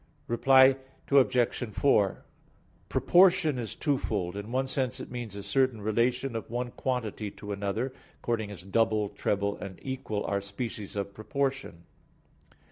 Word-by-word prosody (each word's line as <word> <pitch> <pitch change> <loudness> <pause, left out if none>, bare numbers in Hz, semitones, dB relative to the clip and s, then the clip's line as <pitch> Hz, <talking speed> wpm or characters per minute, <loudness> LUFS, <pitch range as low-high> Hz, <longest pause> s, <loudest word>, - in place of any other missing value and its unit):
Reply 130 +2 +5 0.3
Obj. 130 -3 +3
4: 105 -8 +2 0.6
Proportion 175 -6 +4
is 115 -3 -5
twofold. 105 - -1
In 100 +3 -6
one 130 +1 +1
sense 130 -2 -2
it - - -8
means 120 -5 -5
a 100 - -6
certain 130 -2 +1
relation 115 +4 0
of 115 - -4
one 120 +1 -3
quantity 115 -5 -3
to 105 +1 -9
another, 100 +6 -2 0.3
according 110 -3 -2
as 100 -3 -8
double, 105 +1 +1
treble 100 0 -1
and 95 -2 -7
equal 130 -6 -3
are 100 0 0
species 100 +1 -6
of 100 0 -3
proportion. 135 - -3
115 Hz, 135 wpm, -29 LUFS, 100-130 Hz, 0.6 s, Reply